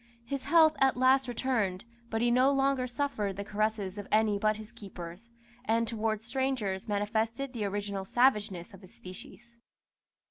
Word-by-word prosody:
His 275 Hz, +2 st, -4 dB
health 320 Hz, -2 st, +5 dB
at 265 Hz, -2 st, +3 dB
last 260 Hz, +1 st, +4 dB
returned, 230 Hz, -7 st, -1 dB, 0.2 s
but 225 Hz, 0 st, -1 dB
he 240 Hz, -, +3 dB
no 255 Hz, +2 st, +5 dB
longer 270 Hz, -2 st, +1 dB
suffered 240 Hz, -6 st, -2 dB
the 200 Hz, -, -3 dB
caresses 210 Hz, -1 st, -2 dB
of 205 Hz, -, -7 dB
any 215 Hz, -1 st, +3 dB
but 215 Hz, 0 st, +2 dB
his 215 Hz, 0 st, -9 dB
keepers, 190 Hz, +2 st, -10 dB, 0.4 s
and 230 Hz, 0 st, +1 dB
towards 220 Hz, -1 st, -2 dB
strangers 245 Hz, -7 st, -1 dB
manifested 220 Hz, +5 st, -1 dB
the 220 Hz, -4 st, -2 dB
original 200 Hz, -1 st, -3 dB
savageness 205 Hz, -5 st, +1 dB
of 195 Hz, -, -13 dB
his 185 Hz, -, -14 dB
species. 235 Hz, +6 st, -11 dB
220 Hz, 155 wpm, -30 LUFS, 200-255 Hz, 0.4 s, health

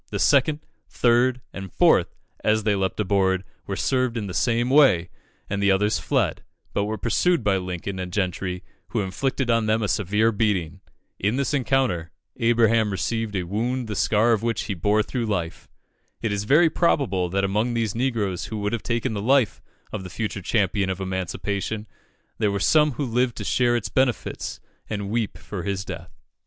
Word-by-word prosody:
The -, -, -3 dB
second, 145 Hz, +2 st, +3 dB, 0.3 s
third, 125 Hz, +1 st, +2 dB
and 95 Hz, -2 st, -7 dB
fourth, -, -, +3 dB, 0.3 s
as 110 Hz, 0 st, +2 dB
they 105 Hz, -1 st, +2 dB
leaped 95 Hz, +1 st, -1 dB
aboard, 95 Hz, -2 st, +2 dB, 0.2 s
were 100 Hz, -, -2 dB
served 130 Hz, +1 st, 0 dB
in 110 Hz, -, -2 dB
the 95 Hz, -, -6 dB
same 120 Hz, +3 st, +1 dB
way, 110 Hz, -, +5 dB, 0.4 s
and 100 Hz, 0 st, -2 dB
the 100 Hz, -, +3 dB
others 105 Hz, +2 st, +2 dB
fled, -, -, 0 dB, 0.3 s
but 100 Hz, -, 0 dB
were 110 Hz, +1 st, -3 dB
pursued 165 Hz, -, +1 dB
by 100 Hz, -2 st, +2 dB
Lincoln 90 Hz, +1 st, -4 dB
and 90 Hz, -1 st, -4 dB
Gentry, 90 Hz, -1 st, -2 dB, 0.2 s
who 115 Hz, -, -1 dB
inflicted 125 Hz, +6 st, -1 dB
on 115 Hz, -1 st, +2 dB
them 110 Hz, +1 st, +2 dB
a -, -, 0 dB
severe 105 Hz, +3 st, +2 dB
beating. 100 Hz, -7 st, 0 dB, 0.4 s
In 105 Hz, +4 st, +1 dB
this 140 Hz, +1 st, -1 dB
encounter, 130 Hz, -, +1 dB, 0.3 s
Abraham 115 Hz, -2 st, +3 dB
received 110 Hz, +2 st, -2 dB
a 95 Hz, -, 0 dB
wound 115 Hz, +7 st, -2 dB
the 105 Hz, -, -4 dB
scar 110 Hz, +4 st, +3 dB
of 110 Hz, -3 st, +2 dB
which 115 Hz, -1 st, -1 dB
he 105 Hz, -, -3 dB
bore 105 Hz, +4 st, +2 dB
through 120 Hz, +1 st, -3 dB
life. 90 Hz, -6 st, -3 dB, 0.5 s
It 115 Hz, -, -2 dB
is 100 Hz, 0 st, -2 dB
very 155 Hz, +7 st, +5 dB
probable 115 Hz, -, +1 dB
that 100 Hz, +2 st, 0 dB
among 105 Hz, +5 st, 0 dB
these 115 Hz, -3 st, 0 dB
negroes 115 Hz, -7 st, -1 dB
who 110 Hz, -, -5 dB
would 105 Hz, +1 st, -2 dB
have 115 Hz, -, -1 dB
taken 115 Hz, +6 st, -1 dB
the 100 Hz, -, -3 dB
life 130 Hz, -1 st, +2 dB, 0.3 s
of 105 Hz, -, -4 dB
the 90 Hz, -, -7 dB
future 105 Hz, 0 st, -4 dB
champion 100 Hz, -1 st, +1 dB
of 95 Hz, 0 st, -2 dB
emancipation, 95 Hz, +3 st, -3 dB, 0.5 s
there 105 Hz, -2 st, +2 dB
were 100 Hz, -, -1 dB
some 150 Hz, +7 st, +4 dB
who 140 Hz, +4 st, -2 dB
lived 125 Hz, 0 st, 0 dB
to -, -, -5 dB
share 120 Hz, -1 st, +2 dB
its 120 Hz, -, -2 dB
benefits 130 Hz, -3 st, -1 dB, 0.3 s
and 100 Hz, -2 st, -3 dB
weep 115 Hz, -2 st, -1 dB
for 100 Hz, -4 st, -6 dB
his 95 Hz, 0 st, -3 dB
death. 85 Hz, -2 st, -8 dB
105 Hz, 185 wpm, -24 LUFS, 95-120 Hz, 0.5 s, way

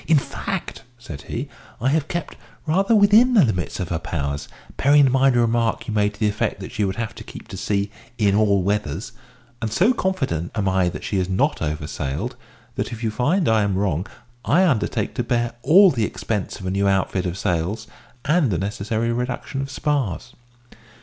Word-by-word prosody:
"In 160 Hz, -, +5 dB
fact," 135 Hz, -, -4 dB, 0.2 s
said 80 Hz, -12 st, -9 dB
he, 130 Hz, +5 st, -3 dB, 0.3 s
"I 130 Hz, -, +1 dB
have 155 Hz, +1 st, +1 dB
kept 170 Hz, -4 st, -4 dB, 0.3 s
rather 195 Hz, +8 st, +2 dB
within 215 Hz, +5 st, +6 dB
the 195 Hz, -9 st, +7 dB
limit 90 Hz, -6 st, -2 dB
of 90 Hz, -, -3 dB
her 80 Hz, -, -1 dB
powers, 70 Hz, -3 st, -3 dB, 0.3 s
bearing 145 Hz, +1 st, +5 dB
in 130 Hz, -, +2 dB
mind 135 Hz, 0 st, +4 dB
a 120 Hz, -, +4 dB
remark 115 Hz, -1 st, 0 dB
you 110 Hz, -, -3 dB
made 105 Hz, -1 st, +1 dB
to -, -, -20 dB
the 110 Hz, -, +2 dB
effect 105 Hz, 0 st, -1 dB
that 95 Hz, -, -7 dB
she 110 Hz, -3 st, -1 dB
would 95 Hz, -1 st, -1 dB
have 115 Hz, 0 st, -3 dB
to -, -, -10 dB
keep -, -, -11 dB
to -, -, -7 dB
sea 100 Hz, 0 st, -1 dB, 0.3 s
in 105 Hz, -4 st, +3 dB
all 100 Hz, -2 st, +3 dB
weathers; 100 Hz, -2 st, -2 dB, 0.5 s
and 110 Hz, -2 st, -2 dB
so 195 Hz, -, +3 dB
confident 135 Hz, -, -2 dB
am 105 Hz, -3 st, 0 dB
I 95 Hz, -1 st, +2 dB
that -, -, -7 dB
she 100 Hz, -, -2 dB
is 90 Hz, 0 st, -1 dB
not 140 Hz, +11 st, +1 dB
over 75 Hz, -1 st, -2 dB
sailed, 70 Hz, -2 st, -4 dB, 0.4 s
that -, -, -2 dB
if 115 Hz, 0 st, -7 dB
you 110 Hz, -, 0 dB
find 155 Hz, -, +1 dB
I 110 Hz, -1 st, +4 dB
am 100 Hz, -2 st, 0 dB
wrong, 95 Hz, -2 st, 0 dB, 0.4 s
I 180 Hz, +7 st, +4 dB
undertake 110 Hz, -, 0 dB
to 120 Hz, -, -1 dB
bear 120 Hz, 0 st, 0 dB
all 185 Hz, +6 st, +7 dB
the 115 Hz, -5 st, 0 dB
expense 105 Hz, -1 st, -3 dB
of 95 Hz, -, -8 dB
a 95 Hz, -, -1 dB
new 100 Hz, +1 st, +1 dB
outfit 95 Hz, -1 st, +1 dB
of 90 Hz, +1 st, -4 dB
sails, 90 Hz, +5 st, -1 dB, 0.4 s
and 150 Hz, -1 st, +3 dB
the 90 Hz, -, 0 dB
necessary 110 Hz, +4 st, -2 dB
reduction 125 Hz, +3 st, -3 dB
of 135 Hz, -, -5 dB
spars. 130 Hz, -, -2 dB
110 Hz, 205 wpm, -22 LUFS, 95-135 Hz, 0.5 s, the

